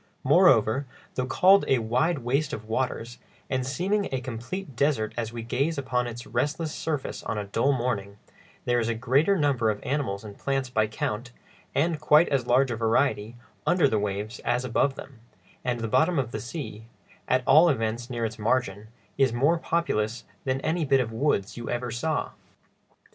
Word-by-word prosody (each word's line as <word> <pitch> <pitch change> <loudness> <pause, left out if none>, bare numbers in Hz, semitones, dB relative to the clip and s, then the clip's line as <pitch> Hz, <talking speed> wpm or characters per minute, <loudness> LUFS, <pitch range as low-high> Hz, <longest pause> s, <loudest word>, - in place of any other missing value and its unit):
Moreover, 135 - +4 0.3
though 125 0 -2
called 190 +8 +5
a 135 - +4
"wide 125 +9 +1
waste 140 +5 0
of 110 - -5
waters," 120 0 -2 0.3
and 130 -1 0
seeming 185 +10 -1
a 130 - -1
complete 130 +6 -6
desert 135 -6 +1
as 115 -1 -3
we 115 -1 -6
gaze 140 +7 -1
upon 125 -2 -1
its 120 0 -7
restless 155 +1 -2
surface 150 -4 -3
on 110 - -3
a 105 - -2
dull 115 +7 +1
morning, 115 -6 -2 0.5
there 120 0 +2
is 115 0 -1
a 115 - 0
greater 135 - +2
number 135 -8 +2
of 105 -1 -1
animals 125 -9 -2
and 105 -2 -10
plants 135 -2 -1
by 110 -3 +2
count, 110 +3 -3 0.4
and 160 +1 +1
quite 150 +2 +5
as 135 -4 0
large 130 +1 +3
a - - -1
variety, 115 0 +1 0.3
under 175 -4 +4
the 110 -5 +1
waves 105 +3 -3
as 120 +1 -1
above 135 +3 +1
them, 135 -4 -11 0.4
and 120 -2 -1
the 115 - -1
bottom 160 +9 +2
of 125 -4 -1
the 110 - -4
sea—at 125 0 -5
all 155 +5 +7
events 115 -2 -1
near 120 -2 -2
its 110 0 -5
margin—is 115 +3 -1
more 145 +8 +2
populous 120 -11 -1 0.2
than 130 0 0
any 165 +3 0
bit 135 -2 +3
of 115 -3 -1
woods 115 -5 0
you 120 - -6
ever 120 0 -2
saw. 155 +7 -2
125 Hz, 175 wpm, -26 LUFS, 115-140 Hz, 0.5 s, all